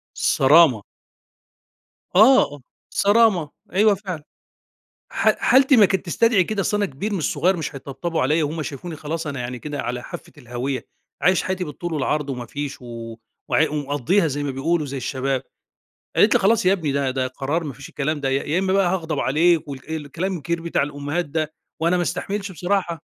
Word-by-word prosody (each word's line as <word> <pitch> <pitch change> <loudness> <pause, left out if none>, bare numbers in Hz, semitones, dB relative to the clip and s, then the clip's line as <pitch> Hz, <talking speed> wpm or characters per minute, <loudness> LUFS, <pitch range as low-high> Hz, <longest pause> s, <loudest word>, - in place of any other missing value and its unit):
الصرامة. 135 -5 +5 1.3
آه. 215 - +5 0.3
صرامة، 200 -7 +3 0.2
أيوه 205 +1 +4
فعلًا. 185 -6 -6 0.9
ح - - +3
حالتي 265 +1 +5
ما 205 -3 +7
كانت 190 -2 -1
تستدعي 200 +1 +3
كده، 215 0 -2
أصل 210 - 0
أنا 205 -1 +1
كبير 200 +10 -4
مش 165 - -1
صغير 175 +5 +2
مش 155 -3 -4
هيتطبطبوا 140 +5 -3
عليّا 155 +4 +2
وهُم 155 +2 -3
شافوني 155 +3 -6
خلاص 160 +2 -4
أنا 140 -3 -4
يعني 125 0 -4
كده 145 +1 -5
على 125 0 -4
حافة - - -9
الهاوية، 125 0 -4 0.4
عايش 185 0 +4
حياتي 185 -1 -2
بالطول 165 +3 -6
والعرض 145 0 -1
وما 125 -2 -5
فيش 145 -2 -6
و 115 -1 -7 0.3
وع 155 - +3
ومقضّيها 150 +5 +1
زي 145 0 -2
ما 140 - -2
بيقولوا 150 +4 0
زي 140 0 -5
الشباب. 130 0 -2 0.7
قالت - - +5
لي: - - +4
"خلاص 215 0 +3
يا 190 - +6
ابني 160 -7 -1
ده 140 -1 0
ده 130 0 -1
قرار 145 +6 -2
ما 145 - -4
فيش 135 +2 -11
الكلام 150 +1 -2
ده، 135 - -1
يا 135 +1 +1
يا 160 +5 0
إمّا 190 0 0
بقى 195 -2 +3
هاغضب 160 -5 -2
عليك،" 160 +3 +2
والك 140 +2 -8
الكلام 160 +5 -3
الكبير 170 +2 -3
بتاع 170 -4 0
الأُمّهات 145 +4 -2
ده، 155 +1 -3 0.3
وأنا 170 +2 +2
ما 175 - +1
أستحملش 195 +3 -3
بصراحة. 175 -2 -1
155 Hz, 180 wpm, -22 LUFS, 140-180 Hz, 1.3 s, ما